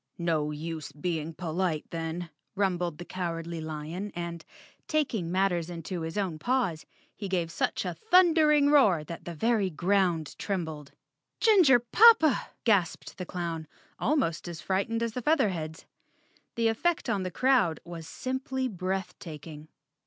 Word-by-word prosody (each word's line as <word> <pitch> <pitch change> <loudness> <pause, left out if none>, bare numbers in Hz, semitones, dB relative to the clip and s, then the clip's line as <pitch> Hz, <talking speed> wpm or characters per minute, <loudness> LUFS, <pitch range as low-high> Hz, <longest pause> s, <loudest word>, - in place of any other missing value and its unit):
"No 160 -3 0
use 155 0 -5
being 160 +1 -3
polite 170 -2 -1
then," 165 +1 -4 0.2
rumbled 180 -5 0
the 175 - -8
Cowardly 170 -2 -4
Lion 160 +6 -5
and, 170 -2 -5 0.4
taking 230 - 0
matters 180 -3 +1
into 175 +1 -5
his 160 +4 -4
own 185 -6 -1
paws, 230 -7 0 0.3
he 200 -2 -6
gave 175 -3 -1
such - - -1
a - - -2
thundering 320 -8 +4
roar 205 - +5
that 165 +2 -8
the 170 - -6
very 220 +1 +1
ground 175 -2 +1
trembled. 160 -7 -4 0.5
"Ginger 375 - +6
poppa!" 315 - +5 0.2
gasped 195 -5 +1
the 180 - -5
clown, 170 -3 -4 0.3
almost 230 - 0
as 170 -2 -6
fright¬ 190 +4 -1
ened 230 0 -1
as 230 - -1
the 250 - -3
Featherheads. 190 - 0 0.7
The 230 -2 +2
effect 315 +10 0
on 200 - 0
the 185 - -2
crowd 225 -5 +2
was 165 -2 -8
simply 260 +2 -3
breath 190 -1 -3
taking. 155 -2 -9
180 Hz, 145 wpm, -28 LUFS, 165-230 Hz, 0.7 s, Ginger